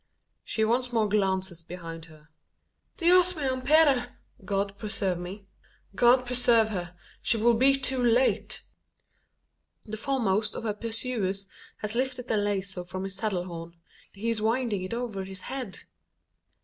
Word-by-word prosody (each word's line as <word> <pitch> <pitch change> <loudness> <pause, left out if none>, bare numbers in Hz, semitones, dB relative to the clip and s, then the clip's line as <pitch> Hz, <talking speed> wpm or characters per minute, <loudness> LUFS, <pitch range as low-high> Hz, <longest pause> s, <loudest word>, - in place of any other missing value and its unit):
She 220 - 0
once 245 +2 +1
more 225 -3 +2
glances 190 -4 0
behind 165 -1 -8
her. 155 -2 -18 0.7
"Dios 360 +1 +5
me 305 - -4
ampare!" 265 -1 +3 0.3
(God 195 +1 -1
preserve 195 -4 -2
me.) 190 +3 -7 0.5
God 245 +4 +5
preserve 240 -3 +3
her! 180 -4 -5 0.3
She 230 - +1
will 235 +2 +4
be 265 +4 +5
too 260 -1 0
late! 240 +2 +2 1.2
The 220 0 -6
foremost 220 -4 0
of - - -5
her 215 -2 -1
pursuers 215 -3 -1 0.3
has 210 0 +2
lifted 250 0 -1
the 220 - +2
lazo 195 -3 -1
from 185 +2 -6
his 195 0 -4
saddle 195 -2 -1
horn: 170 -1 -8 0.4
he 225 +4 -2
is 220 -2 -2
winding 225 -2 0
it 185 +5 -4
over 230 -5 -3
his 190 0 -7
head! 255 -5 -4
215 Hz, 145 wpm, -28 LUFS, 190-245 Hz, 1.2 s, Dios